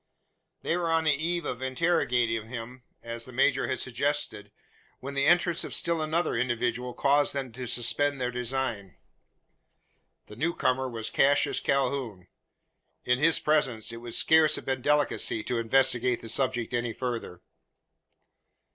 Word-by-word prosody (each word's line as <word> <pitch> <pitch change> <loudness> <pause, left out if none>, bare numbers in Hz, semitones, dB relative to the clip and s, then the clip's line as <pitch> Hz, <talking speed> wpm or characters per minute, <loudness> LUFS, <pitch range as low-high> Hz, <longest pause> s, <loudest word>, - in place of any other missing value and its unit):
They 165 - 0
were 170 -2 -1
on 165 0 +2
the 155 -2 +3
eve 165 +3 -2
of 125 -2 -4
interrogating 125 -6 0
him 125 +1 -8 0.2
as 115 0 -4
the 130 - -9
major 135 +2 +2
had 130 - -1
suggested 125 -5 -2 0.5
when 140 +2 -7
the 140 0 +1
entrance 175 0 +3
of - - -5
still 170 -1 0
another 155 +2 0
individual 120 0 -1
caused 145 +1 +2
them 135 -3 -3
to 125 +2 -7
suspend 140 +4 +1
their 125 -1 -1
design. 125 -5 -3 1.3
The 105 - -12
new 165 +8 -1
comer 130 +1 0
was 115 -2 -5
Cassius 145 +1 +3
Calhoun. 135 -8 -1 0.8
In 125 0 +2
his 160 +2 +4
presence 130 -8 0
it 115 - -7
would 120 0 -6
scarce 160 -1 +4
have - - -6
been 130 -1 -2
delicacy 145 -6 +1
to 120 - -2
investigate 125 +1 +2
the 115 - -7
subject 125 0 0
any 120 -1 -1
further. 120 -8 -5
130 Hz, 150 wpm, -27 LUFS, 120-145 Hz, 1.3 s, his